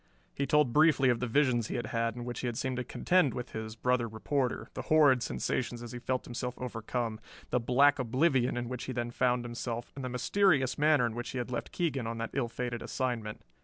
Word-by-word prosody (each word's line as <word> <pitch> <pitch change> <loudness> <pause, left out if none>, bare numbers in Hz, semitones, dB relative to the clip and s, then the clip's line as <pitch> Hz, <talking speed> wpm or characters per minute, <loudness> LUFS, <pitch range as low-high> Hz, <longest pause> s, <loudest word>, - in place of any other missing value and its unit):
He 140 - -2
told 150 -6 +3
briefly 150 -3 +5
of 120 -2 +2
the 125 - -1
visions 120 -3 +2
he - - -4
had 120 -2 -2
had 115 0 -1
in 120 -1 -6
which 120 0 -5
he 125 - -2
had 120 -2 -3
seemed 130 -1 -2
to 125 - -1
contend 175 +3 +2
with 125 0 -5
his 110 0 -5
brother 125 0 +1
reporter, 125 +4 -2
the - - -4
horrid 145 -5 +6
sensations 120 0 -2
as 120 - -7
he 125 - -6
felt 130 +1 -2
himself 125 +1 -4
overcome, 115 -2 -3 0.3
the 125 - +2
black 140 +4 +4
oblivion 130 0 +2
in 120 0 -2
which 125 0 -5
he 130 - -4
then 120 -1 -2
found 125 0 +1
himself, 120 0 -4
and 135 - -6
the 130 - -3
mysterious 135 +1 +2
manner 150 -4 +4
in 115 - -2
which 120 +1 -5
he 130 - -5
had 125 0 -3
left 120 - -4
Keegan 140 -9 -1
on 115 0 -4
that 115 0 -4
ill 130 -3 -1
fated 120 0 -4
assignment. 120 -5 -3
125 Hz, 230 wpm, -31 LUFS, 120-135 Hz, 0.3 s, horrid